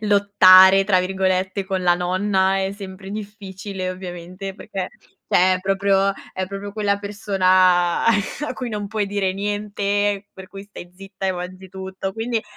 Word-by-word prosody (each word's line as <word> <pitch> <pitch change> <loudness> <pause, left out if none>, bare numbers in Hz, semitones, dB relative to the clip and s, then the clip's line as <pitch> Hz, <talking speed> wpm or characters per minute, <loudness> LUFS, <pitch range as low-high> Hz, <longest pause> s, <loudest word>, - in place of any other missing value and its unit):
lottare, 195 -2 +6
tra 190 -2 +3
virgolette, 190 +1 -1
con 190 -1 -2
la 175 -1 +4
nonna 190 +2 +1
è 190 0 -1
sempre 195 -1 -9
difficile, 200 -2 -6
ovviamente, 185 +1 -7
perché 195 -3 -5 0.4
cioè 185 +1 +4
è - - -2
proprio 195 +1 +2 0.2
è 185 0 -3
proprio 200 +1 -7
quella 205 -1 0
persona 185 -4 +2
a 230 +7 0
cui 250 -2 -5
non 210 -1 -4
puoi 215 0 -1
dire 195 -2 -1
niente, 205 0 -1
per 190 0 -12
cui 195 0 -10
stai 200 -3 -11
zitta 195 0 -7
e 190 - +1
mangi 185 +1 -8
tutto. 190 +1 -6
Quindi, 225 0 -2
195 Hz, 155 wpm, -21 LUFS, 185-205 Hz, 0.4 s, lottare